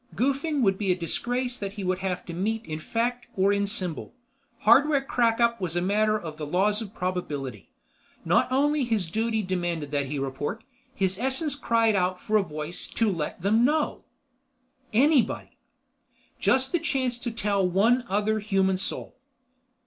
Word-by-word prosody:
Goofing 280 +3 0
would 195 -2 +2
be 200 -3 +1
a - - +3
disgrace 245 +8 -2
that 200 -1 -4
he 205 -2 -6
would 185 0 0
have 185 -2 -3
to 170 - -7
meet 220 +6 -2
in 155 -1 -5
fact 240 +7 -2
or 195 +1 +3
in 200 0 0
symbol. 190 -2 -3 0.5
Hardware 275 +5 +5
crackup 235 -3 +2
was 175 -2 -2
a - - +2
matter 215 +3 +2
of 160 -4 -8
the 150 - -3
laws 205 +7 +1
of 210 -2 -8
probability. 145 - -4 0.6
Not - - +3
only 290 +2 +2
his 215 -8 -1
duty 220 +1 0
demanded 175 -5 -2
that 140 -2 0
he 145 +2 -3
report, 135 - -3 0.3
his 190 0 0
essence 265 +4 0
cried 230 -6 +2
out 180 -1 0
for 215 - -2
a - - +4
voice 155 0 -6
to 225 -3 +1
let 165 0 -4
them 220 +4 +3
know. 300 +4 +1 0.9
Anybody. 260 0 +2 0.8
Just 265 0 +2
the 345 - +2
chance 255 -5 -1
to 240 - -3
tell 205 -4 0
one 210 +8 +3
other 210 +2 +1
human 195 -3 +1
soul. 195 - -4
210 Hz, 165 wpm, -26 LUFS, 180-240 Hz, 0.9 s, Hardware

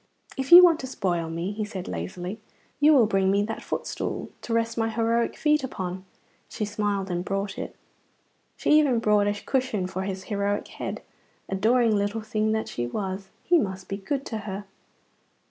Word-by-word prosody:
"If 265 0 -4
you 355 +1 +12
want 335 -3 +6
to 260 - -5
spoil 175 -9 -1
me," 170 +4 -3
he 215 +1 -3
said 195 -3 -6
lazily, 175 - -5 0.4
"you 295 +2 +6
will 265 -7 +6
bring 195 -2 +2
me 200 +1 +3
that 225 +1 -4
footstool - - -4
to - - -7
rest 230 0 +1
my 225 -1 0
heroic 230 +1 0
feet 300 -1 +2
upon." 185 -6 -5 0.4
She 210 - -3
smiled 205 -2 -2
and 175 0 -1
brought 195 0 -2
it. - - -6 0.8
She - - 0
even 275 -6 +3
brought 210 -2 +3
a 205 0 -2
cushion 255 -8 0
for 185 0 -4
his 190 -1 -4
heroic 205 0 -1
head. - - -6 0.5
Adoring 220 +3 +3
little 205 +2 -1
thing 215 0 0
that 220 0 -1
she 120 0 -3
was, 190 - -4
he 345 0 +4
must 190 -6 -3
be 195 - -3
good 270 +8 -3
to 220 - -4
her. 200 -1 -6
205 Hz, 180 wpm, -26 LUFS, 190-230 Hz, 0.8 s, you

